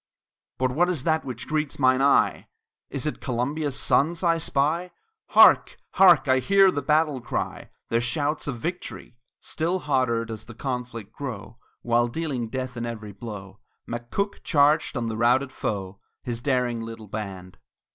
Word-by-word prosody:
But 130 0 0
what 175 +7 +2
is 165 -8 -2
that 160 -1 +1
which 125 -3 -7
greets 155 -1 -2
mine 130 0 +3
eye? 140 +1 +3 0.4
Is 140 0 -4
it 150 - -3
Columbia's 135 +3 -2
sons 165 +5 +2
I 165 -1 +3
spy? 160 +4 0 0.4
Hark! - - +6
hark! 180 -6 +6
I 130 0 +4
hear 195 +8 +5
their 145 - -2
battle 150 -1 +1
cry 120 - -4 0.2
Their 115 +1 +1
shouts 145 +6 -1
of 130 -4 -3
victory! 170 -3 -6 0.2
Still 170 +3 -2
hotter 130 -8 0
does 110 -1 -7
the 120 - -12
conflict 120 -5 -5
grow; 115 -3 -7 0.2
While 120 0 +2
dealing 130 -4 -3
death 130 0 -4
in 120 0 -4
every 110 -3 -6
blow, 100 -2 -9 0.3
McCook 120 - -3
charged 150 -1 +3
on 120 -1 -2
the 110 -1 -3
routed 125 +4 +2
foe 100 -4 -4 0.2
His 120 -1 -4
daring 125 -3 0
little 115 -1 -8
band. 95 -3 -7
130 Hz, 155 wpm, -25 LUFS, 115-150 Hz, 0.4 s, Hark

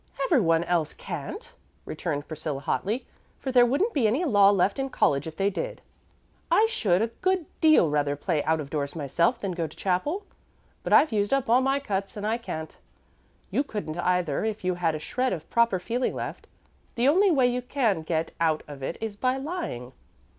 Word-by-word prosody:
"Every 280 -6 +3
one 165 -2 +3
else 170 -3 0
can't," 435 +4 -7 0.3
returned 145 -4 -4
Priscilla, 155 -3 -4
hotly, 210 - -2 0.3
"for 265 - -4
there 245 -1 +6
wouldn't 360 - +1
be 250 -6 +3
any 265 +12 +1
law 205 -8 +6
left 200 +3 +2
in 270 0 -1
college 140 - +1
if 160 - -8
they 200 +1 +1
did. - - -4 0.7
I 435 - +5
should 210 - +1
a 230 - -1
good 370 -2 +1 0.2
deal 310 - +6
rather 145 -1 0
play 150 +1 -1
out 160 0 +2
of 140 -2 -6
doors 145 -1 -2
myself 170 - +1
than 195 -4 -3
go 170 -2 -2
to 155 - -15
chapel, 290 - -1 0.6
but - - -5
I've 310 - +6
used 205 +3 +1
up 265 -4 -1
all 250 +2 +6
my 270 +1 +1
cuts 200 -4 -3
and 205 - -4
I 225 +2 0
can't. 160 -8 -6 0.8
You 275 - +1
couldn't 200 - -5
either 180 -4 0
if 220 -2 -3
you 185 0 +1
had 170 -3 0
a - - -4
shred 255 +10 -1
of 160 -3 -6
proper 235 -4 +3
feeling 240 +7 -2
left. - - -6 0.5
The 245 +2 +2
only 380 +8 +5
way 275 -7 +4
you 245 0 +1
can 240 - 0
get 160 0 -2
out 160 -2 +1
of 145 -2 -9
it 135 - -4
is 220 -2 -4
by 255 +5 0
lying." 270 - -5
200 Hz, 200 wpm, -26 LUFS, 160-260 Hz, 0.8 s, there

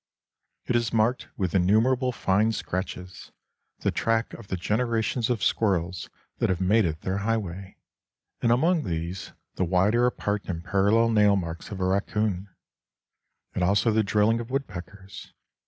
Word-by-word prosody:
It 125 - 0
is 115 -2 +1
marked 115 +3 +1
with 95 -5 -1
innumerable 115 +8 +3
fine 110 0 +1
scratches, 90 -1 -5 0.5
the - - +1
track 115 0 0
of 115 - -10
the 95 - -3
generations 115 +4 0
of 120 -5 -1
squirrels 95 -4 0 0.3
that - - +1
have 90 -2 0
made 100 +3 +3
it 80 -1 -3
their 95 +1 -2
highway; 100 -4 -3 0.6
and 115 - +3
among 160 +7 +3
these, 85 +1 -4 0.2
the - - +1
wider 100 +7 +3
apart 105 -4 -2
and 85 -2 -4
parallel 100 +5 +3
nail 105 -2 +5
marks 85 -2 -4
of 100 -3 -6
a 95 - 0
raccoon, 100 0 -1 1.0
and 90 - -1
also 100 +4 +3
the 110 +1 +3
drilling 105 +2 +2
of 120 0 -6
woodpeckers. 100 - -6
105 Hz, 150 wpm, -26 LUFS, 95-115 Hz, 1.0 s, nail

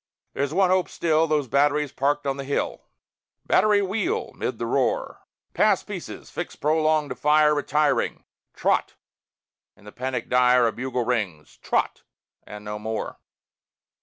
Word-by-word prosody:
There's 140 +1 -1
one 185 +2 +3
hope, 185 -1 +2
still, 160 -1 +1
Those 150 -3 0
batteries 145 +2 +2
parked 145 +2 0
on 135 0 -1
the 140 - -4
hill! 140 +1 -2 0.6
"Battery, 205 +1 +3
wheel!" 280 - -2
('mid - - -4
the - - -3
roar), - - 0 0.3
"Pass 210 -3 +3
pieces; 200 -5 -8
fix 175 - -5
prolonge 155 -1 +1
to 125 - -4
fire 150 +3 +4
Retiring. 150 0 0 0.3
Trot!" - - 0 0.8
In 105 - -21
the 105 - -10
panic 130 +2 -4
dire 125 -1 +4
A 115 - +2
bugle 125 0 -3
rings 100 -12 -2
"Trot!" - - -1 0.5
and 105 0 -9
no 105 0 -5
more. 110 +1 -4
145 Hz, 145 wpm, -24 LUFS, 125-160 Hz, 0.8 s, fire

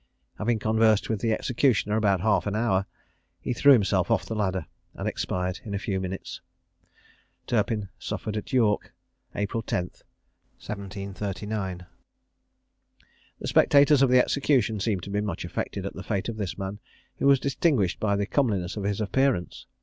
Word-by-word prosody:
Having 115 +2 +1
conversed 110 0 +2
with 105 -3 -2
the 115 - +1
executioner 115 -2 +1
about 100 -4 +2
half 105 0 +2
an 100 - -1
hour, 100 -4 +1 0.5
he 105 - -2
threw 140 +4 +6
himself 100 -6 +3
off 115 -3 +2
the - - -4
ladder, 95 -6 -1 0.3
and - - -4
expired 90 0 -2
in 100 -2 -4
a - - 0
few 100 -1 -2
minutes. 95 0 -5 1.0
Turpin 105 -4 0
suffered 110 - -4
at 105 - -5
York, 110 -5 +1 0.4
April 105 +3 -1
10, 90 -5 -2 0.6
1739. 100 -1 -5 1.5
The - - -5
spectators 145 0 +5
of 135 - +5
the 125 - +5
execution 125 -4 +2
seemed 100 -3 -1
to 100 - -7
be 105 +1 0
much 100 -5 -3
affected - - -4
at - - -4
the - - -7
fate 100 0 -2
of 115 - -5
this 100 -4 -4
man, 95 +1 -5 0.4
who - - +1
was 140 -1 +6
distinguished 135 - +1
by 100 -2 +1
the 100 0 0
comeliness 100 -8 0
of 105 - -4
his 100 +1 -1
appearance. 125 -3 0
105 Hz, 160 wpm, -26 LUFS, 95-115 Hz, 1.5 s, threw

